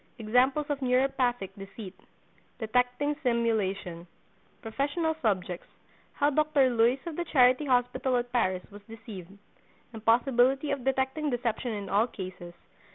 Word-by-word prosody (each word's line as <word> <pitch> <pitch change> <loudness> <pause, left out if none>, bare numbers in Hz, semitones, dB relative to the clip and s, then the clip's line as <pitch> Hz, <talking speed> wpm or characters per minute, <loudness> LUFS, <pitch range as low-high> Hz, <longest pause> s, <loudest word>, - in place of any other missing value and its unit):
—Examples 250 +6 +2
of 290 -1 -1
Neuropathic 250 -5 +1
Deceit.—Detecting 245 +6 -4
Simulation.—Professional 225 - -2
Subjects.—How 200 - -3
Dr. 295 -3 +3
Luys 235 +2 +3
of 335 -3 -5
the 345 - -3
Charity 255 -1 +4
Hospital 250 0 +1
at 245 0 -3
Paris 185 -7 0
Was 205 +1 -11
Deceived.—Impossibility 225 - -1
of 280 -3 -2
Detecting 270 +3 0
Deception 245 -1 -2
in 205 -2 -5
All 210 +5 +2
Cases. 185 -5 -8
245 Hz, 100 wpm, -28 LUFS, 210-270 Hz, -, Charity